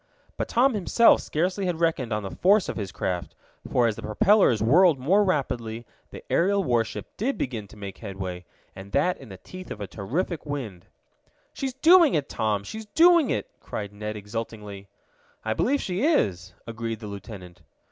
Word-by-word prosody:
But - - -3
Tom 255 +3 +3
himself 215 +3 +4
scarcely 185 +5 -1
had 175 -2 -2
reckoned 160 -8 0
on 105 -1 -1
the 95 - -6
force 200 +2 +4
of - - -4
his 100 -4 -4
craft, 90 -2 -3 0.4
for 125 - +3
as 110 -2 +1
the - - -7
propellers 125 - +3
whirled 160 - +5
more 180 +11 +3
rapidly 120 - -2 0.2
the - - -10
aerial 200 +3 +2
warship 120 -7 -1
did 260 +7 -1
begin 115 -6 -4
to 105 - -16
make 100 -2 -8
headway, 95 -4 -6 0.3
and 95 +1 -11
that 180 - +1
in 135 - -12
the 95 - -9
teeth 185 - -11
of - - -7
a 100 - -4
terrific 145 - -3
wind. 125 - -6 0.7
"She's 265 -2 -4
doing 330 +2 +6
it, 145 -3 -1
Tom! 105 -2 -1
She's 220 - -8
doing 335 +5 +5
it!" - - -1
cried 100 -1 -6
Ned 105 +1 -5
exultingly. 105 -1 -7 0.6
"I 110 - +1
believe 280 - +1
she 185 +2 -2
is," 95 - +1
agreed 115 -1 -5
the 110 - -9
lieutenant. 100 -4 -9
120 Hz, 175 wpm, -25 LUFS, -, 0.7 s, doing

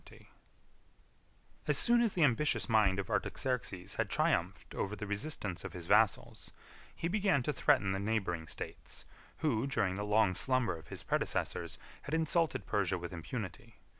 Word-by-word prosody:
] - - -33
As - - +2
soon 240 0 +4
as 230 -4 +1
the 170 - +3
ambitious 145 +2 +2
mind 105 -5 +4
of 100 - -3
Artaxerxes 120 -8 -1
had - - 0
triumphed - - 0
ever 100 +2 -2
the 105 - -5
resistance 100 - -3
of - - -6
his 85 -2 -7
vassals, 105 +3 +2 0.5
he 170 - -2
began 195 -7 +2
to 150 - 0
threaten 100 -6 +3
the 95 - -1
neighboring 100 -6 -1
states, - - -6 0.4
who, 130 -3 +2
during 100 -9 +1
the 100 +2 -3
long 105 -2 +3
slumber 130 0 +1
of 80 - -12
his - - -8
predecessors, - - -1 0.2
had 150 - -2
insulted 160 0 +1
Persia 95 -3 +1
with 85 +1 -6
impunity. 110 +4 -6
110 Hz, 160 wpm, -33 LUFS, 95-140 Hz, 0.5 s, soon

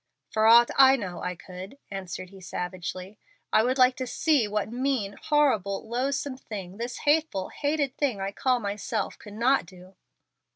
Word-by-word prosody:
"For 220 0 +3
aught 235 +1 +7
I 270 0 +8
know 185 -8 -5
I 180 0 -3
could," 185 +7 -10
answered 185 -1 -6
he, 195 -1 -13
savagely. 185 +2 -6 0.3
"I - - +6
would 255 +4 +1
like 255 0 +5
to 255 - -3
see 290 -4 +2
what 210 +1 -2
mean, 245 -5 -1
horrible, 220 -11 +1
loathsome 260 +3 -2
thing, 195 -6 -8
this 240 +1 -5
hateful, 295 -10 +2
hated 285 -2 -1
thing 260 -9 0
I 195 +1 -2
call 255 +4 +1
myself 205 0 -3
could 205 - -11
not 245 -2 +2
do." 185 +2 -15
220 Hz, 165 wpm, -27 LUFS, 195-265 Hz, 0.3 s, I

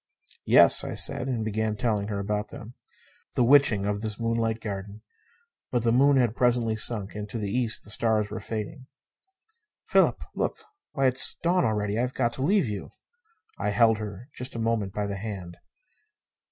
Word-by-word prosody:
"Yes," - - +7
I - - -4
said. 125 - +1
And 120 -4 -2
began 110 0 -1
telling 105 -2 -1
her 105 -2 -3
about 105 +1 -2
them. 115 +3 -10 0.6
The 125 - +3
witching 120 -6 +5
of 100 0 -1
this 110 -1 -4
moonlit 115 -1 0
garden! 100 0 -6 0.7
But 120 -2 0
the 115 - +3
moon 140 +3 +4
had 120 -3 +2
presently 120 -3 +2
sunk, 105 -2 -2
and 105 0 -6
to 115 - -4
the 105 -3 -3
east 120 -1 -1
the 105 - -8
stars 110 -2 0
were 110 - -4
fading. 115 +6 -6 1.0
"Philip! - - +2
Look! - - -2 0.4
Why, 135 - +1
it's 130 0 +2
dawn 175 -2 +2
already. 105 -1 -1
I've 125 +1 -1
got 120 -2 0
to - - -6
leave 185 - +2
you." 105 -3 -5 0.7
I - - 0
held 115 +1 +3
her 105 +2 -7
just 125 -1 -7
a - - -3
moment 110 -3 0
by 105 +1 -2
the 100 -1 -4
hand. 95 -5 -6
110 Hz, 180 wpm, -26 LUFS, 105-120 Hz, 1.0 s, Yes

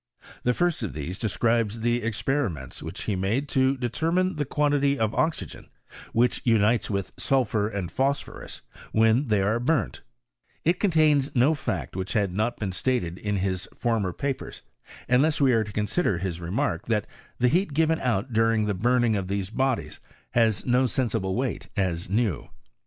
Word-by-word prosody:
The 125 0 +1
first 175 -5 +1
of 110 - -3
these 85 +6 -5
describes 115 0 0
the 120 +1 +1
experiments 110 - -2
which - - -6
he 105 - -1
made 105 +10 0
to 130 +1 +2
determine 165 +9 0
the 145 - -1
quantity 145 0 +1
of 110 -2 0
oxygen 150 - -2 0.4
which 120 +2 +2
unites 115 0 +3
with 100 -2 -2
sulphur 115 -6 +1
and 100 -5 -4
phosphorus 140 +2 -3 0.3
when 115 +5 +3
they 105 -3 +2
are 110 +4 +1
burnt; 130 - 0 0.6
it 170 +3 +2
contains 155 -7 +3
no 130 +6 +4
fact 95 - -4
which 95 +1 -3
he - - +2
had 100 -3 0
not 110 +5 -1 0.2
stated 90 -5 -1
in 105 -1 -2
his 95 -1 -2
former 115 -6 0
papers, 135 +9 -4 0.4
unless 140 +5 +3
we 135 -3 +4
are 115 -1 +3
to 105 - -8
consider 105 - 0
hiB 90 -1 -3
remark, 110 +13 -2
that 105 -3 +1 0.3
the 125 - +3
heat 165 +2 +1
given 160 +1 +2
out 120 0 -1
during 115 -1 +3
the 105 - 0
burning 120 +3 +2
of 95 -2 -2
these 100 0 -2
bodies 130 +1 -1 0.3
has 115 -4 +2
no 125 +1 +3
sensible 110 -6 -1
weight, 130 +1 -2
as 90 -3 -1
new. 105 - 0
115 Hz, 165 wpm, -26 LUFS, 100-135 Hz, 0.6 s, no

